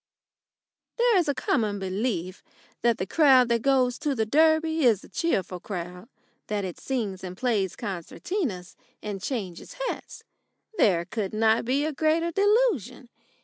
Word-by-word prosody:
There 480 -1 +4
is 345 -3 +2
a 285 - 0
common 215 -5 0
belief 190 -1 -3 0.4
that 235 -1 +2
the 185 - -2
crowd 260 - +5
that 235 -1 +2
goes 255 -2 +2
to 290 -3 -1
the 220 -2 0
Derby 315 +4 +3
is 225 -6 +3
a - - -14
cheerful 190 - -1
crowd 180 +2 -7 0.4
that 205 -2 -2
it 180 - -7
sings 210 -8 -3
and 185 -1 -7
plays 210 -7 0
concertinas 195 - -4 0.3
and 205 -2 -5
changes 195 -8 -5
hats. - - -6 0.6
There 170 -4 +3
could 210 +1 -4
not 220 +1 +3
be 275 +4 +1
a 310 - -2
greater 320 +3 +1
delusion. 405 - +1
230 Hz, 145 wpm, -26 LUFS, 190-300 Hz, 0.6 s, crowd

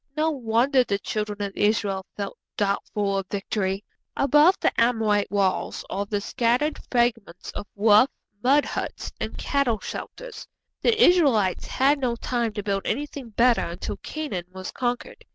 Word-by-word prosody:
No 315 +1 +2
wonder 255 0 +2
the 200 -4 -1
Children 210 0 -3
of 200 -1 -4
Israel, 205 -3 0
felt 200 -1 -4 0.2
doubtful 200 0 0
of 190 - -6
victory! 195 -1 -2 0.3
Above 295 +6 +5
the - - +2
Amorite 220 -4 +2
walls 195 -1 0
are 200 +1 -2
the 205 0 -1
scattered 245 +7 0
fragments 235 -8 0
of 205 - -7
rough 210 +4 +5 0.3
mud 280 +5 +4
huts - - -4
and - - -4
cattle 275 -6 +1
shelters. - - -8 0.3
The 455 -2 +2
Israelites 275 - +4
had 280 +2 +2
no 250 -3 0
time 235 -1 -1
to 205 - -4
build 195 -1 -1
anything 285 -3 -3
better 235 +2 +3
until 170 +2 -5
Canaan 290 - -5
was 185 0 -7
conquered. 245 -1 -3
225 Hz, 150 wpm, -25 LUFS, 200-270 Hz, 0.3 s, Above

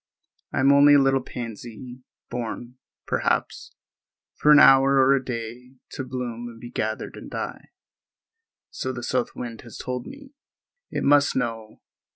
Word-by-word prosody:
I - - 0
am 135 +1 +5
only 145 +1 +7
a - - +7
little 135 -1 +3
pansy, 120 +1 -8 0.3
born, 120 +1 -5 0.3
perhaps, - - -2 0.6
for 150 - +3
an 150 - +9
hour 135 -1 +7
or 135 0 +5
a 135 -1 +1
day, 125 +1 -7 0.2
to - - -5
bloom 125 -2 -5
and 115 -1 -13
be 120 +1 -10
gathered 110 -1 -3
and - - -10
die—so 455 - -9
the 120 -1 -7
south 125 0 -1
wind 115 -2 -7
has 120 - -12
told 125 -1 -5
me. 280 0 -12 0.6
It - - -3
must 145 -1 +4
know. 115 -4 -4
125 Hz, 150 wpm, -24 LUFS, 120-135 Hz, 0.6 s, an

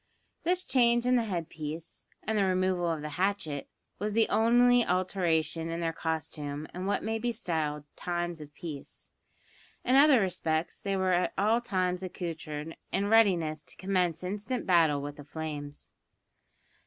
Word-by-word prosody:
This 360 +2 +1
change 240 -2 +3
in 250 0 +4
the 235 -2 +2
head 175 -6 -2
piece, 155 +2 -7 0.2
and 220 - -1
the 205 - +3
removal 185 -2 +1
of 160 -2 -2
the 150 - -4
hatchet, 190 -8 -1 0.3
was 210 +2 -2
the 225 0 +4
only 240 +2 +5
alteration 175 -3 0
in 165 0 -3
their 165 -1 -1
costume 155 -2 -3
in 185 +2 -4
what 205 - 0
may 225 +1 -1
be 240 +1 0
styled 160 -9 -2
"times 175 -2 -3
of 150 -1 -10
peace." 155 -6 -8 0.7
In 255 - +4
other 280 -2 +7
respects 165 -4 -1
they 195 -1 -1
were 190 -1 +1
at 180 +1 +1
all 220 +4 +3
times 185 -5 -1
accoutred, 165 -4 -5 0.2
and 195 - +1
in - - -1
readiness 175 -9 +4
to - - -13
commence 185 -3 0
instant 210 +7 -3
battle 160 -6 +4
with 145 0 -6
the 145 - -9
flames. 145 -1 -6
180 Hz, 165 wpm, -30 LUFS, 160-210 Hz, 0.7 s, other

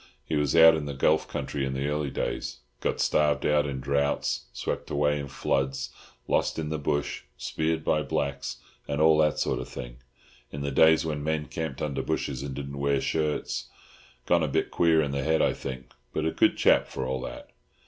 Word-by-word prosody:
He - - -2
was 75 0 +1
out 80 0 +9
in 80 -2 -2
the 70 - -4
Gulf 80 +3 +2
country 70 - -3
in 65 0 -1
the 70 +1 -1
early 75 -1 -1
days—got 60 -1 -4
starved 75 -1 +2
out 75 0 +3
in 70 -2 -3
droughts, 70 +2 0
swept 60 - -4
away 75 0 +1
in 70 - -5
floods, 70 +1 -1 0.4
lost - - +1
in 80 -2 -2
the 80 0 -2
bush, 75 0 -1 0.2
speared 80 0 -1
by 75 - +2
blacks, 70 -1 -2 0.3
and 70 0 -2
all 80 0 +5
that 75 -1 +3
sort - - 0
of - - -6
thing, - - -8 0.5
in 70 - -5
the 70 0 -2
days 80 +3 +5
when 75 -2 -3
men 80 0 -1
camped 80 -5 -4
under 70 -2 -1
bushes 65 -2 -2
and 70 -1 -5
didn't 70 0 -6
wear 70 -1 +2
shirts. 75 -5 -1 0.6
Gone 85 -1 +3
a 80 - +1
bit 70 - 0
queer 80 -2 +4
in 70 - -2
the 70 0 -1
head, 80 +3 +2
I - - +3
think, 65 -2 -7 0.2
but 80 - -1
a 80 - +1
good - - +3
chap - - +4
for 65 - -4
all 65 0 -2
that." - - -8
70 Hz, 200 wpm, -27 LUFS, 70-80 Hz, 0.6 s, out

